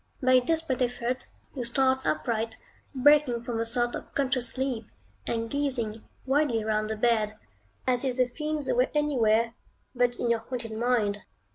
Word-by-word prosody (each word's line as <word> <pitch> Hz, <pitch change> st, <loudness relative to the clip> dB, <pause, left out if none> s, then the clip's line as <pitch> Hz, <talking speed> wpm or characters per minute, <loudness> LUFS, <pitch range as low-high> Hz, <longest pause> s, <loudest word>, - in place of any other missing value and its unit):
By 255 Hz, -2 st, +2 dB
a 255 Hz, -, +7 dB
desperate 315 Hz, -2 st, 0 dB
effort, 245 Hz, 0 st, -1 dB, 0.3 s
you 255 Hz, -, -3 dB
start 260 Hz, +2 st, +2 dB
upright, 225 Hz, -5 st, -1 dB, 0.4 s
breaking 265 Hz, -3 st, +4 dB
from 235 Hz, -2 st, -3 dB
a 230 Hz, -, 0 dB
sort 240 Hz, +1 st, 0 dB
of -, -, -7 dB
conscious 260 Hz, -3 st, +1 dB
sleep, 255 Hz, -4 st, -2 dB, 0.4 s
and 230 Hz, 0 st, -1 dB
gazing 240 Hz, -5 st, -1 dB, 0.2 s
wildly 265 Hz, -4 st, +2 dB
round 215 Hz, 0 st, 0 dB
the 220 Hz, -, -2 dB
bed, 215 Hz, -2 st, +1 dB, 0.5 s
as 250 Hz, 0 st, +2 dB
if 260 Hz, -2 st, -1 dB
the 255 Hz, -, +4 dB
fiends 300 Hz, +3 st, -3 dB
were -, -, +2 dB
anywhere 235 Hz, -6 st, +2 dB, 0.4 s
but 245 Hz, -1 st, +2 dB
in 240 Hz, -1 st, 0 dB
your 230 Hz, -, +2 dB
haunted 230 Hz, -1 st, -6 dB
mind. 220 Hz, -3 st, +1 dB
245 Hz, 160 wpm, -28 LUFS, 230-265 Hz, 0.5 s, a